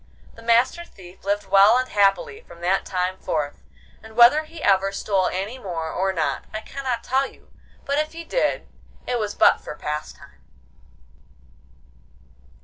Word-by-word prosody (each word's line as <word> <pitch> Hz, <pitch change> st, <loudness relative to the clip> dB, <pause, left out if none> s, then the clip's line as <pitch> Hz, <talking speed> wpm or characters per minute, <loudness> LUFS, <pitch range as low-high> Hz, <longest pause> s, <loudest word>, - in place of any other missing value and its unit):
The 230 Hz, -, -14 dB
Master 235 Hz, +8 st, +2 dB
Thief 185 Hz, -, -16 dB
lived 205 Hz, +1 st, -1 dB
well 200 Hz, +4 st, +6 dB
and 255 Hz, 0 st, 0 dB
happily 415 Hz, -, +1 dB
from 170 Hz, -, -16 dB
that 185 Hz, +2 st, 0 dB
time 185 Hz, 0 st, -2 dB
forth, 150 Hz, -2 st, -3 dB, 0.4 s
and 220 Hz, 0 st, -14 dB
whether 245 Hz, +7 st, +6 dB
he 325 Hz, +2 st, -11 dB
ever 195 Hz, 0 st, +3 dB
stole 195 Hz, -2 st, 0 dB
any 205 Hz, +7 st, -4 dB
more 165 Hz, -7 st, -4 dB
or 190 Hz, +1 st, 0 dB
not 165 Hz, -5 st, -2 dB
I 215 Hz, -, -5 dB
cannot 255 Hz, -2 st, -4 dB
tell 270 Hz, +1 st, +1 dB
you, -, -, -20 dB, 0.3 s
but 280 Hz, +1 st, 0 dB
if 310 Hz, +1 st, -2 dB
he 335 Hz, 0 st, -7 dB
did -, -, -1 dB, 0.4 s
it 245 Hz, -1 st, -1 dB
was 210 Hz, -2 st, -3 dB
but -, -, +4 dB
for -, -, -8 dB
pastime. 150 Hz, 0 st, -7 dB
205 Hz, 155 wpm, -23 LUFS, 190-260 Hz, 0.4 s, well